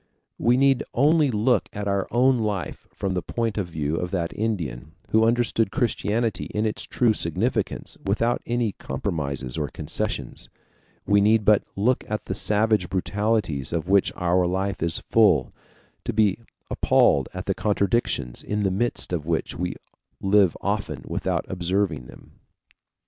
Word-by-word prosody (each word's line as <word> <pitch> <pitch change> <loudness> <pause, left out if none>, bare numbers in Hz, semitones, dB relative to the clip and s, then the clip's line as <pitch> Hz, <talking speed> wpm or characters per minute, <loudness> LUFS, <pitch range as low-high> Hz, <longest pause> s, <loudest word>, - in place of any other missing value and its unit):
We 120 +1 +3
need 135 -1 +3
only 150 +3 +4
look 115 +2 +1
at 105 -1 -4
our 100 -1 0
life 115 - +1
from 95 -1 -3
the 90 - -1
point 115 +1 -2
of 95 - -2
view 80 -2 -2
of 90 - -2
that 85 -3 -2
Indian, 80 - -3 0.2
who 110 0 +4
understood 115 -2 +2
Christianity 115 0 0
in 105 +1 +1
its 110 - -1
true 120 -3 +2
significance, 85 -6 -2
without 115 +5 0
any 120 -2 0
compromises 70 -7 -3
or 75 - -1
concessions, - - -4 0.6
we 100 0 +4
need 110 +1 +3
but 105 -1 +5
look 120 +6 +1
at 105 0 -3
the - - -3
savage 105 -3 +1
brutalities 95 - 0
of 85 0 -2
which 100 -1 +4
our 90 0 +2
life 95 +2 -2
is 85 0 0
full, 100 - +3 0.5
to - - -2
be 105 -2 +2 0.3
appalled - - +3
at - - -6
the - - +1
contradictions 100 - 0
in 105 0 -2
the 95 - +1
midst 105 -1 -1
of 80 -3 -2
which 85 -1 -1
we 90 +1 -3 0.4
live 95 -2 +3
often 100 - -2
without - - -1
observing 90 -6 -1
them. - - -16
100 Hz, 150 wpm, -24 LUFS, 85-110 Hz, 0.6 s, but